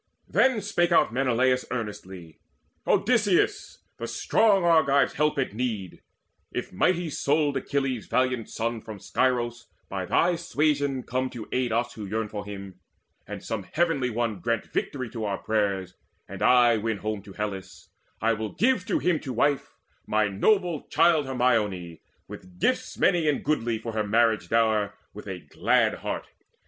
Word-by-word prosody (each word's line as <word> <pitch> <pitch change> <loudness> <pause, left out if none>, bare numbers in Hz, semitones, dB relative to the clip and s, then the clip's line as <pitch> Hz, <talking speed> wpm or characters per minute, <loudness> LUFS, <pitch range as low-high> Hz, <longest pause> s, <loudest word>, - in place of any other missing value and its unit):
Then 260 0 +4
out 210 - -4
spake 175 -4 +1 0.2
Menelaus 125 0 +2
earnestly: 95 -8 -6 0.5
"Odysseus, 230 - +2 0.2
the - - -5
strong 205 -4 +2
Argives' 140 -6 +4
help 150 0 +1
at 135 -6 -1
need, 110 -6 -4 0.5
If - - -5
mighty 170 - +1
souled 145 0 +1
Achilles' 135 -5 -2
valiant 125 -3 0
son 115 0 -3
From 110 -1 -8
Scyros 120 +1 -1 0.2
by 95 -2 -4
thy 175 - +2
suasion 145 -5 0
come 130 +2 -2
to 120 -4 -8
aid 125 -2 0
Us 120 +2 0
who 105 -2 -7
yearn 110 +1 -2
for 105 -1 -5
him, 100 -2 -9 0.5
and - - -7
some 110 -2 -3
Heavenly 135 - 0
One 115 -3 -2
Grant 115 +4 -1
victory 130 -3 -2
to 115 -3 -4
our 100 -2 -1
prayers, 100 -4 -1 0.3
and - - -9
I 120 -2 +5
win 110 0 -2
home 105 0 -3
To 100 0 -13
Hellas, 100 -2 -6 0.3
I 115 +1 +2
will 110 -1 -4
give 230 -4 +1
to 205 - +1
him 175 -3 +1
to 130 - -6
wife 140 +4 0 0.3
My 110 0 +2
noble 175 - +1
child 155 -5 +3
Hermione, 105 -10 0 0.3
with 90 -1 -12
gifts - - 0
Many 165 -3 +3
and 145 - -1
goodly 120 -6 0
for 115 +1 -6
her 110 -1 0
marriage 110 +1 +2
dower 110 -3 +2 0.2
With 105 0 -10
a 95 -2 -5
glad 75 - +1
heart. - - -4
120 Hz, 155 wpm, -26 LUFS, 105-145 Hz, 0.5 s, I